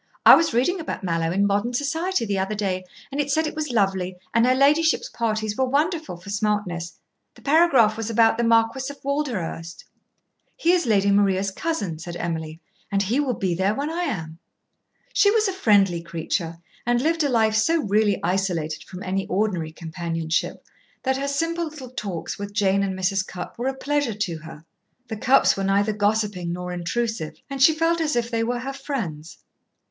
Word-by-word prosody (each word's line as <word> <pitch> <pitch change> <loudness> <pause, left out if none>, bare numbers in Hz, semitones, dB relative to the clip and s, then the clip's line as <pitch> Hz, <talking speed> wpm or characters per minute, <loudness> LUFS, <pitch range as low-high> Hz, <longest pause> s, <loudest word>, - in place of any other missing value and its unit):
I - - +11
was 330 0 +5
reading 265 +11 +1
about 315 -9 -5
Mallowe 165 -2 0
in 195 +3 +2
'Modern 205 +5 0
Society' 320 +3 0
the 200 -2 -1
other 195 +3 -1
day, 190 -3 -2 0.3
and 280 +2 0
it 285 - -4
said 315 +3 +2
it 310 - -4
was 305 -1 -3
lovely 190 -5 0 0.2
and 230 +1 +4
her 255 - +4
ladyship's 300 +4 +3
parties 220 -2 -2
were 260 - +1
wonderful 310 - 0
for 185 +3 -9
smartness. 200 -5 -2 0.4
The - - -18
paragraph 275 -8 +4
was 225 -1 -3
about 225 0 +3
the - - +2
Marquis 230 +3 +2
of 285 - -9
Walderhurst." 235 - -3 0.7
"He 340 - +3
is 355 -7 +2
Lady 200 -2 +3
Maria's 195 -1 +2
cousin," 200 - -3
said 175 +1 -7
Emily, 160 -2 -4 0.3
"and 200 0 +2
he 230 +8 0
will 265 -5 0
be 185 -3 -1
there 190 +4 +1
when 290 +3 -2
I 350 +2 -1
am." 160 - -4 0.7
She 405 - +5
was 435 0 +3
a 385 - -1
friendly 200 - +3
creature, 165 0 -3 0.3
and 240 0 +2
lived 325 +4 +1
a 285 - +1
life 220 -3 +3
so 325 +9 +2
really 210 0 +2
isolated 170 -4 -1
from 185 0 -9
any 190 +1 -2
ordinary 185 -5 -1
companionship 165 0 -3 0.4
that 265 0 +1
her 275 +1 -2
simple 330 +4 -1
little 295 -5 -9
talks 200 -10 -5
with 205 0 -6
Jane 200 -1 +2
and 190 -1 -2
Mrs. 190 +1 +1
Cupp 180 +4 -8
were 245 - -1
a 265 - -1
pleasure 285 -4 -1
to 180 -6 -3
her. 160 0 -12 0.4
The 220 - -4
Cupps 255 +5 +4
were 195 - -3
neither 200 +2 +2
gossiping 205 -4 0
nor 180 +1 -4
intrusive, 180 0 -2 0.2
and 275 -1 -4
she 310 +3 +7
felt 330 +1 +1
as 305 -4 0
if 235 0 -1
they 225 -1 0
were 240 +1 -2
her 270 +2 -4
friends. 210 - -5
215 Hz, 190 wpm, -23 LUFS, 185-275 Hz, 0.7 s, I